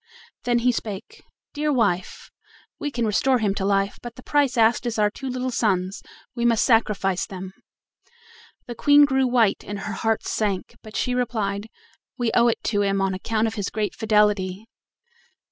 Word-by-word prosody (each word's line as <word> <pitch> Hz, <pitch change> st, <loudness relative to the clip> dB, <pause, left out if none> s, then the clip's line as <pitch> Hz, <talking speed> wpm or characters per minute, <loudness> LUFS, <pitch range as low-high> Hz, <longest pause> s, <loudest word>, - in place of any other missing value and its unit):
Then 240 Hz, -1 st, +2 dB
he 250 Hz, -, +5 dB
spake: 215 Hz, -3 st, -6 dB, 0.3 s
"Dear 300 Hz, 0 st, 0 dB
wife, 200 Hz, -9 st, -1 dB, 0.5 s
we 295 Hz, -, -2 dB
can 240 Hz, -4 st, -2 dB
restore 220 Hz, +5 st, +2 dB
him 210 Hz, -4 st, 0 dB
to 195 Hz, -, -3 dB
life, 195 Hz, 0 st, 0 dB
but 240 Hz, -1 st, -8 dB
the 255 Hz, -, -13 dB
price 285 Hz, -4 st, +1 dB
asked 230 Hz, +2 st, +3 dB
is 230 Hz, -, -2 dB
our 210 Hz, -1 st, +2 dB
two 270 Hz, +4 st, -6 dB
little 255 Hz, 0 st, -2 dB
sons; 195 Hz, -5 st, 0 dB, 0.3 s
we 235 Hz, -, -3 dB
must 235 Hz, -2 st, +3 dB
sacrifice 210 Hz, -6 st, +1 dB
them." 190 Hz, -1 st, -8 dB, 1.1 s
The 240 Hz, -, -6 dB
Queen 290 Hz, +4 st, +6 dB
grew 265 Hz, -2 st, +1 dB
white 240 Hz, -5 st, +2 dB
and 205 Hz, -1 st, -6 dB
her 210 Hz, -, -4 dB
heart 225 Hz, +2 st, -1 dB
sank, 200 Hz, -4 st, -2 dB
but 215 Hz, 0 st, -12 dB
she 250 Hz, -, 0 dB
replied: 220 Hz, -4 st, -2 dB, 0.5 s
"We 240 Hz, -3 st, 0 dB
owe 240 Hz, 0 st, +4 dB
it 235 Hz, -, 0 dB
to 205 Hz, -2 st, 0 dB
him 195 Hz, -1 st, +1 dB
on 195 Hz, 0 st, 0 dB
account 215 Hz, +4 st, -1 dB
of 225 Hz, -, -2 dB
his 205 Hz, -3 st, -3 dB
great 210 Hz, -1 st, -2 dB
fidelity." 210 Hz, -2 st, +1 dB
220 Hz, 180 wpm, -23 LUFS, 200-245 Hz, 1.1 s, Queen